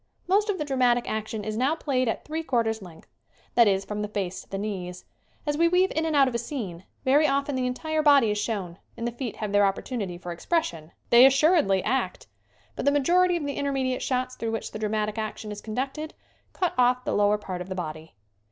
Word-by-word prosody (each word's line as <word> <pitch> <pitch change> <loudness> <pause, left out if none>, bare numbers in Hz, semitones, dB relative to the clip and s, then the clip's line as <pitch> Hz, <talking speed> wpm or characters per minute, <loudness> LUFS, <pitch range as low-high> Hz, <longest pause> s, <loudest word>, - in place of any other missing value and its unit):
Most 410 +4 +2
of 400 - 0
the 300 - -2
dramatic 250 -3 +2
action 220 0 -3
is 215 0 -3
now 265 +7 +1
played 260 -5 0
at - - -3
three 315 +2 -3
quarters 230 -7 0
length; 170 -4 -13 0.5
that 235 -2 +6
is 195 -1 +1
from 210 +1 -4
the 210 - -2
face 195 -3 -3
to - - -19
the 195 - -4
knees. 185 -3 -5 0.4
As 295 0 -1
we 335 - +5
weave 365 +2 +3
in 320 +1 +1
and 315 - 0
out 275 -2 +6
of 255 - -2
a 235 - 0
scene, 210 - -5 0.2
very 290 +4 +5
often 280 +1 0
the 255 -1 0
entire 315 +5 -1
body 280 -7 +5
is 210 - -1
shown 195 -6 -3 0.2
and 230 - -2
the - - -2
feet 240 -1 -5
have 215 -2 -4
their 205 0 +4
opportunity 195 -1 -2
for 175 0 -7
expression 170 - -2 0.2
they 235 +1 +9
assuredly 270 - +4
act! 260 +4 -1 0.5
but - - -4
the 285 - +5
majority 350 +5 +3
of 310 - -4
the 285 - -2
intermediate 265 -2 -1
shots 255 -1 -1
through 230 - -3
which 225 - -4
the 215 - -6
dramatic 215 0 -1
action 215 0 -5
is 210 - -7
conducted 270 +8 -4 0.4
cut 360 -2 -1
off 250 0 +3
the - - -1
lower 205 0 +3
part 185 -3 -6
of 180 - -7
the 190 - -3
body. 160 - -6
240 Hz, 225 wpm, -26 LUFS, 205-285 Hz, 0.5 s, they